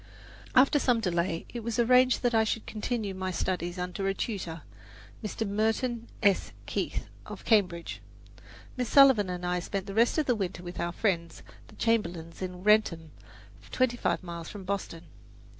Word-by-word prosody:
After 275 Hz, +3 st, +6 dB
some 245 Hz, -4 st, +2 dB
delay 170 Hz, -4 st, -1 dB
it 240 Hz, -, -3 dB
was 230 Hz, 0 st, -3 dB
arranged 250 Hz, +2 st, +4 dB
that 245 Hz, -1 st, +2 dB
I 220 Hz, -1 st, +4 dB
should 220 Hz, 0 st, -2 dB
continue 215 Hz, -2 st, -3 dB
my 185 Hz, 0 st, -3 dB
studies 175 Hz, -1 st, -2 dB
under 180 Hz, +2 st, -3 dB
a 195 Hz, -, 0 dB
tutor, 175 Hz, -8 st, -4 dB, 0.6 s
Mr. 220 Hz, +1 st, -3 dB
Merton 225 Hz, +3 st, 0 dB, 0.2 s
S. 200 Hz, -2 st, +2 dB
Keith, -, -, -2 dB, 0.2 s
of -, -, -9 dB
Cambridge. 185 Hz, -6 st, +1 dB, 0.7 s
Miss 250 Hz, -2 st, -2 dB
Sullivan 265 Hz, -9 st, +6 dB
and 180 Hz, 0 st, -4 dB
I 180 Hz, 0 st, 0 dB
spent 195 Hz, +2 st, -4 dB
the 195 Hz, -, -6 dB
rest 230 Hz, +7 st, +3 dB
of 310 Hz, -, +2 dB
the 250 Hz, -, +3 dB
winter 190 Hz, -5 st, -3 dB
with 175 Hz, 0 st, -7 dB
our 170 Hz, 0 st, -1 dB
friends, 170 Hz, -4 st, -1 dB, 0.2 s
the -, -, -16 dB
Chamberlins 175 Hz, -8 st, -1 dB
in 180 Hz, -1 st, -5 dB
Wrentham, 195 Hz, -7 st, +3 dB, 0.6 s
twenty 255 Hz, -2 st, +1 dB
five 240 Hz, -, -1 dB
miles 170 Hz, -2 st, -7 dB
from 205 Hz, -2 st, -8 dB
Boston. 185 Hz, -4 st, -4 dB
200 Hz, 165 wpm, -29 LUFS, 180-230 Hz, 0.7 s, After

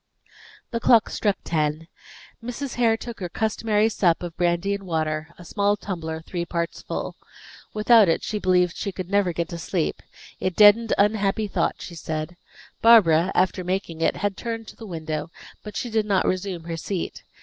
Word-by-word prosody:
The 230 Hz, -, -1 dB
clock 230 Hz, -1 st, +4 dB
struck 205 Hz, -3 st, 0 dB
ten. 155 Hz, 0 st, -1 dB, 0.6 s
Mrs. 245 Hz, +2 st, -5 dB
Hare 230 Hz, -2 st, +2 dB
took 235 Hz, 0 st, -8 dB
her 180 Hz, -2 st, -4 dB
customary 220 Hz, +1 st, +1 dB
sup 180 Hz, -6 st, +1 dB
of 170 Hz, -2 st, -6 dB
brandy 175 Hz, +3 st, +1 dB
and 200 Hz, -1 st, -5 dB
water, 155 Hz, -2 st, -1 dB
a 175 Hz, -, -12 dB
small 205 Hz, +2 st, +1 dB
tumbler 160 Hz, -5 st, -5 dB
three 175 Hz, +1 st, -4 dB
parts 170 Hz, -1 st, -3 dB
full. -, -, -5 dB, 0.6 s
Without 215 Hz, -2 st, +6 dB
it 165 Hz, -, +1 dB
she 210 Hz, -, -2 dB
believed 180 Hz, -2 st, +2 dB
she 200 Hz, -, -3 dB
could 185 Hz, 0 st, -7 dB
never 200 Hz, -3 st, +2 dB
get 170 Hz, 0 st, -2 dB
to 170 Hz, -, -6 dB
sleep; 170 Hz, 0 st, -2 dB, 0.4 s
it 185 Hz, -2 st, -2 dB
deadened 215 Hz, +2 st, +6 dB
unhappy 205 Hz, 0 st, +2 dB
thought, -, -, 0 dB
she 175 Hz, -, -8 dB
said. 160 Hz, +1 st, -5 dB, 0.5 s
Barbara, 190 Hz, -7 st, +6 dB
after 185 Hz, 0 st, +1 dB
making 180 Hz, -3 st, -3 dB
it, -, -, +2 dB
had 205 Hz, -1 st, -2 dB
turned 230 Hz, +2 st, -3 dB
again -, -, -16 dB
to -, -, -21 dB
the 225 Hz, -, -10 dB
window, 155 Hz, -3 st, -4 dB, 0.3 s
but 210 Hz, -, -7 dB
she 240 Hz, -, -3 dB
did 220 Hz, -1 st, +1 dB
not 195 Hz, -2 st, +2 dB
resume 185 Hz, -2 st, -2 dB
her 165 Hz, 0 st, -5 dB
seat. 180 Hz, +2 st, -4 dB
185 Hz, 185 wpm, -24 LUFS, 170-210 Hz, 0.6 s, Without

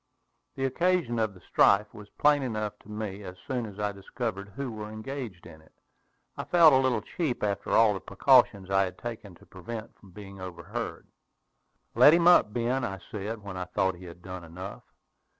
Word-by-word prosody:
The 135 Hz, -, -1 dB
occasion 160 Hz, -3 st, +1 dB
of 110 Hz, -3 st, -1 dB
the 90 Hz, -, -16 dB
strife 100 Hz, +1 st, +3 dB
was 105 Hz, -2 st, -12 dB
plain 145 Hz, -1 st, +4 dB
enough 110 Hz, -5 st, -3 dB
to -, -, -19 dB
me 105 Hz, -2 st, -5 dB
as 90 Hz, -2 st, -8 dB
soon 125 Hz, -3 st, -2 dB
as 100 Hz, -2 st, -11 dB
I 105 Hz, 0 st, 0 dB
discovered 100 Hz, 0 st, -5 dB
who 130 Hz, +5 st, -5 dB
were 105 Hz, -1 st, -7 dB
engaged 110 Hz, -3 st, -7 dB
in 80 Hz, -, -13 dB
it. 80 Hz, -, -24 dB, 0.6 s
I -, -, -4 dB
felt 170 Hz, -4 st, +6 dB
a -, -, +6 dB
little 130 Hz, -5 st, +1 dB
cheap 145 Hz, -2 st, -3 dB
after 100 Hz, -1 st, -2 dB
all 110 Hz, -2 st, +5 dB
the 95 Hz, -, -4 dB
precautions 95 Hz, +2 st, +3 dB
I 95 Hz, 0 st, +4 dB
had 90 Hz, -, -7 dB
taken 110 Hz, -6 st, -7 dB
to -, -, -19 dB
prevent 105 Hz, -1 st, -9 dB
being 100 Hz, -2 st, -10 dB
overheard. 90 Hz, -2 st, -6 dB, 0.9 s
"Let 150 Hz, -, +7 dB
him 170 Hz, 0 st, +3 dB
up, 175 Hz, -11 st, +6 dB
Ben," 120 Hz, +3 st, -1 dB
I 95 Hz, -4 st, -3 dB
said, 105 Hz, +1 st, -5 dB
when 100 Hz, -2 st, -7 dB
I 90 Hz, -, -3 dB
thought 95 Hz, +1 st, 0 dB
he 90 Hz, +1 st, -12 dB
had 85 Hz, 0 st, -12 dB
done 95 Hz, -2 st, -7 dB
enough. 90 Hz, +4 st, -8 dB
105 Hz, 190 wpm, -28 LUFS, 95-120 Hz, 0.9 s, Let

